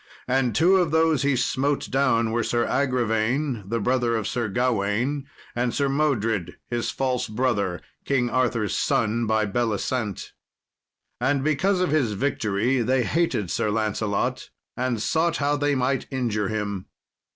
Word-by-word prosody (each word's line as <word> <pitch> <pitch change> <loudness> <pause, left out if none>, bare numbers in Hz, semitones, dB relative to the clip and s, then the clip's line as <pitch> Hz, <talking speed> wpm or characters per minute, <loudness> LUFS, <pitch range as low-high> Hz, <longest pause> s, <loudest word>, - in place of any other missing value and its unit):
And 130 -1 +1
two 180 +5 +5
of 175 -3 +2
those 160 -2 +3
he 140 -1 +2
smote 135 +3 0
down 115 -4 +2
were 120 +1 +1
Sir 120 +2 0
Agravaine, 125 -1 0
the 115 +1 0
brother 120 +1 +1
of 110 -2 -1
Sir 120 -2 -1
Gawain, 125 +5 0 0.3
and 120 0 0
Sir 140 -1 +1
Modred, 115 - 0
his 120 -1 -1
false 125 -2 -1
brother 105 -6 0 0.2
King 130 -3 +1
Arthur's 120 -4 0
son 115 +1 +1
by 110 0 +2
Belisent. 110 0 -2 0.9
And 135 +2 +1
because 180 +6 +1
of 180 - +1
his 135 -9 +2
victory 115 0 0
they 125 +2 +2
hated 125 - 0
Sir 105 - 0
Lancelot, 105 -1 -1 0.3
and 125 -2 -1
sought 165 +8 +1
how 145 0 +1
they 145 0 +1
might 130 +1 0
injure 115 -6 -1
him. 100 -3 -3
125 Hz, 145 wpm, -24 LUFS, 110-140 Hz, 0.9 s, two